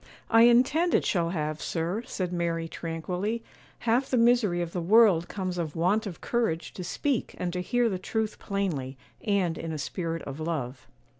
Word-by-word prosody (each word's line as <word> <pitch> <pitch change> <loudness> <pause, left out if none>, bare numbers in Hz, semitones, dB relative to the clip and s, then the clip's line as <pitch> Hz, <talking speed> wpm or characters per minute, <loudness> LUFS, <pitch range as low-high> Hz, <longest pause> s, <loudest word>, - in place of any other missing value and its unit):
'I 225 0 +7
intend 270 +9 +4
it - - +2
shall 170 -3 +1
have, 155 -3 -2
sir,' 170 +6 -2
said 180 -2 -3
Mary, 170 -1 -1
tranquilly; 180 +8 -3 0.4
'half 240 +3 +1
the 255 - +2
misery 230 -6 +4
of 170 -1 -3
the 180 - -2
world 190 -2 +5
comes 185 -3 -3
of 160 -4 -3
want 195 +6 +1
of 175 -5 -8
courage 175 -10 -1
to 180 - -6
speak 250 +8 -1
and 175 -1 -2
to 180 - -2
hear 240 +5 +1
the 190 -4 -2
truth 220 +3 -2
plainly, 160 -10 -2 0.3
and 195 -6 +1
in 165 - -4
a 155 - -3
spirit 165 +3 -3
of 140 +2 -7
love. 140 -6 -4
180 Hz, 180 wpm, -28 LUFS, 165-220 Hz, 0.4 s, I